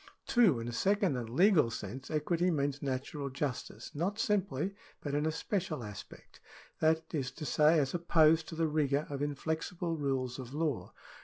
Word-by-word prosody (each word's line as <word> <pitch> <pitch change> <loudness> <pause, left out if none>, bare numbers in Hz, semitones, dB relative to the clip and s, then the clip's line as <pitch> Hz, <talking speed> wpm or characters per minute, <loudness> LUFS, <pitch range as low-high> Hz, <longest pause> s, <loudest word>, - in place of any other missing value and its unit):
2. 210 - +4
In 115 - -5
a - - -3
second 195 - +2
and 120 -3 -4
legal 165 - +4
sense 115 +4 -6
equity 165 +3 +1
means 145 -3 0
natural 140 +1 -3
justice, 135 -1 -4
not 180 +7 -1
simply, 200 -6 0 0.3
but 145 - -4
in 150 +2 +1
a - - +1
special 170 - -2
aspect; 105 -3 -10 0.4
that 160 +1 +1
is 135 -5 -1
to 145 +4 -8
say, 155 +3 +4
as 140 -3 +1
opposed 160 -2 +4
to 165 - -6
the 165 0 +1
rigour 150 -1 +1
of 140 -1 -3
inflexible 160 +4 -2
rules 135 -4 -2
of 130 +1 -7
law. 150 -5 -1
150 Hz, 170 wpm, -32 LUFS, 135-165 Hz, 0.4 s, 2